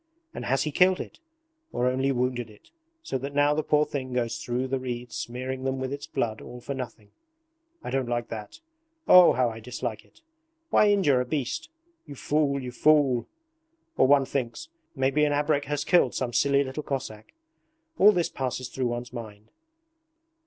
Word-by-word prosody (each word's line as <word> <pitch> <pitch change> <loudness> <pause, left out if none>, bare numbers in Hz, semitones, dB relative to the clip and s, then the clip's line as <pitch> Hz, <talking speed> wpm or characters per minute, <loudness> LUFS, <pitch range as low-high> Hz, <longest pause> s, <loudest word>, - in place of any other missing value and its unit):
And - - -6
has 135 +1 +1
he 150 - -2
killed 185 +4 +4
it? - - -8 0.5
Or 125 - -1
only 130 +2 +1
wounded 125 -2 -1
it 105 - -19 0.3
so 130 - -3
that 140 +2 -6
now 145 +1 +4
the 155 - 0
poor 150 0 +2
thing 130 -3 -5
goes 120 -2 -1
through 125 +2 -2
the 135 0 -1
reeds 125 -1 -5
smearing 130 +2 -4
them 135 0 -1
with 130 +1 -3
its 145 +1 -6
blood 110 -2 -2
all 125 - -9
for 140 - -5
nothing? 120 -5 -8 0.7
I - - -5
don't 130 -2 -1
like 120 -1 -2
that! 105 - -8 0.5
Oh, 180 -1 +8
how 125 -2 +1
I 110 - -8
dislike 115 -1 -5
it! - - -26 0.5
Why 210 - +5
injure 170 -11 +3
a - - +1
beast? 135 - -3 0.4
You 145 - -8
fool, 145 0 0
you 125 -2 -6
fool! 135 -2 +3 0.7
Or - - +4
one 140 0 +5
thinks, 135 - -4 0.3
"Maybe 135 +2 +2
an 145 -1 +2
abrek 145 0 +1
has 145 +1 -2
killed 175 -9 +3
some 125 -2 -2
silly 140 +1 +3
little 135 +3 -5
Cossack." 130 - -6 0.6
All 210 - +8
this 175 -4 0
passes 130 -1 -4
through 130 -1 -2
one's 120 0 -5
mind. 110 -3 -9
130 Hz, 180 wpm, -26 LUFS, 120-145 Hz, 0.7 s, Oh